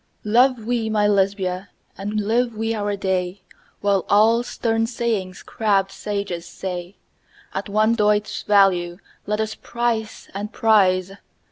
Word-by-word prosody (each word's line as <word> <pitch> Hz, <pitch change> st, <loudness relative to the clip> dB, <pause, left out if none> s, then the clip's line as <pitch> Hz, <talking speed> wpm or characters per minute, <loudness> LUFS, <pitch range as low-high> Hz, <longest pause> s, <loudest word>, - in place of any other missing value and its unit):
Love 240 Hz, +2 st, +3 dB
we 235 Hz, -2 st, -1 dB
(my 210 Hz, -1 st, +2 dB
Lesbia!) 195 Hz, -2 st, 0 dB, 0.3 s
and 205 Hz, +2 st, -3 dB
live 230 Hz, +3 st, 0 dB
we 225 Hz, +1 st, -1 dB
our 205 Hz, -2 st, -1 dB
day, 190 Hz, -1 st, -2 dB, 0.4 s
While 200 Hz, -3 st, +2 dB
all 220 Hz, +3 st, +5 dB
stern 225 Hz, -2 st, -1 dB
sayings 225 Hz, -6 st, -2 dB
crabbed 200 Hz, -3 st, 0 dB
sages 200 Hz, -5 st, -4 dB
say, 180 Hz, +1 st, -6 dB, 0.6 s
At -, -, -4 dB
one 215 Hz, +2 st, +3 dB
doit's 210 Hz, -2 st, +1 dB
value 185 Hz, -4 st, +3 dB, 0.3 s
let 210 Hz, +1 st, -1 dB
us 220 Hz, 0 st, -1 dB
price 235 Hz, -2 st, -3 dB
and 205 Hz, +2 st, -5 dB
prize! 190 Hz, -4 st, +3 dB
210 Hz, 130 wpm, -22 LUFS, 195-225 Hz, 0.6 s, all